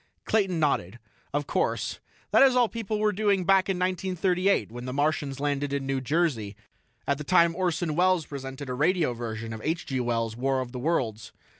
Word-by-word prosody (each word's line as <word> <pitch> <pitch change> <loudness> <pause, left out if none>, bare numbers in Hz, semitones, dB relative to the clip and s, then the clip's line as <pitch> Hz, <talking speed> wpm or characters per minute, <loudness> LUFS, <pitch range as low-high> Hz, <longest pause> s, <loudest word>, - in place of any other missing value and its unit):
Clayton 195 -6 +1
nodded. 120 - 0 0.3
"Of 145 0 -1
course. - - -1 0.3
That - - +5
is 270 -2 +6
all 245 -2 +4
people 220 -2 -3
were 210 0 +2
doing 200 -2 +1
back 195 0 +4
in 190 - 0
1938 185 - 0
when 120 +1 -7
the 130 - -4
Martians 145 -1 0
landed 145 0 -1
in 140 -1 -2
New 135 -1 -1
Jersey, 130 - 0 0.5
at 140 0 +1
the - - -4
time 170 0 +4
Orson 175 -3 -1
Welles 180 -1 +3
presented 135 0 -7
a 125 - -3
radio 160 0 +2
version 115 -1 -5
of 110 - -7
H. 165 +2 -1
G. 130 -1 -2
Wells' 115 -2 -1
'War 135 +2 0
of 125 -2 -4
the 125 - -6
Worlds'. 115 -8 -1
145 Hz, 190 wpm, -27 LUFS, 130-185 Hz, 0.5 s, is